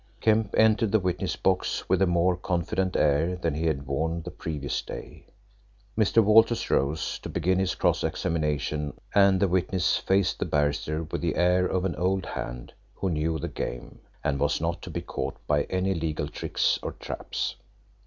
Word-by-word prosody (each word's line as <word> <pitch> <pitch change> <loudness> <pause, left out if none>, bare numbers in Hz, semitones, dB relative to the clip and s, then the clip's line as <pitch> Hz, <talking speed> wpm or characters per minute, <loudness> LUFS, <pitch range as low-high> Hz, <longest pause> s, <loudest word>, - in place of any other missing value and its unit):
Kemp 110 -2 +2
entered 110 -1 +4
the 110 - +4
witness 90 -2 -1
box 95 -1 0
with 95 0 +2
a 95 - +5
more 90 +1 +3
confident 90 +1 -1
air 75 +5 +2
than 85 -4 -1
he 80 +2 -1
had 70 -3 -1
worn 80 +5 -1
the 90 - -6
previous 75 -4 -3
day. - - -9 0.7
Mr. 110 +1 +4
Walters 115 +3 +4
rose 70 +4 0
to - - -7
begin 90 +2 +1
his 95 -1 0
cross - - +1
examination, 75 -2 -1 0.2
and 100 -2 +5
the 100 - +3
witness 90 0 +1
faced 95 -1 +1
the - - 0
barrister 75 +2 0
with 80 - -4
the 85 -3 0
air 90 +1 +3
of 95 0 -1
an 90 - -1
old 95 +1 0
hand - - -6 0.2
who 95 - -1
knew 80 +1 0
the 70 - -4
game, - - -6 0.2
and 70 -1 0
was 75 +1 +1
not 85 +1 -2
to - - -8
be - - -4
caught - - -4
by 75 -1 +2
any 95 +1 0
legal 80 -3 -2
tricks 75 - 0
or - - -4
traps. - - -4
85 Hz, 180 wpm, -27 LUFS, 75-95 Hz, 0.7 s, a